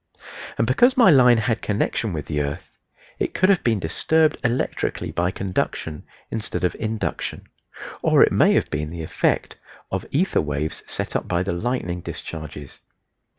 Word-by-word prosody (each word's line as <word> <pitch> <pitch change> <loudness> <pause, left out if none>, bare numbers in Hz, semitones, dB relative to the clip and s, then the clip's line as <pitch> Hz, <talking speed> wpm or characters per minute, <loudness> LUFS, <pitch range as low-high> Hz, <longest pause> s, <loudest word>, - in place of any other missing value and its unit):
And 115 - +2
because 245 - +4
my 230 -8 +7
line 125 -4 +6
had 110 +1 0
connection 105 +1 -1
with 75 -4 -4
the 75 -2 -1
earth 70 0 -5 0.5
it - - -2
could 185 - +3
have 195 -3 +3
been 115 -3 +2
disturbed 155 - +2
electrically 120 +1 -1
by 85 +1 0
conduction 90 -5 -3 0.3
instead 110 -4 -3
of 90 - +2
induction; 110 -1 -3 0.6
or - - +5
it - - +3
may - - +4
have - - +1
been 75 +1 -2
the 85 0 -6
effect - - -1 0.3
of 95 -2 -3
ether 180 +7 +1
waves 75 +1 -3
set - - -4
up - - -1
by 90 0 0
the 95 - -2
lightning 90 -3 -2
discharges. 75 -4 -8
100 Hz, 160 wpm, -23 LUFS, 80-125 Hz, 0.6 s, my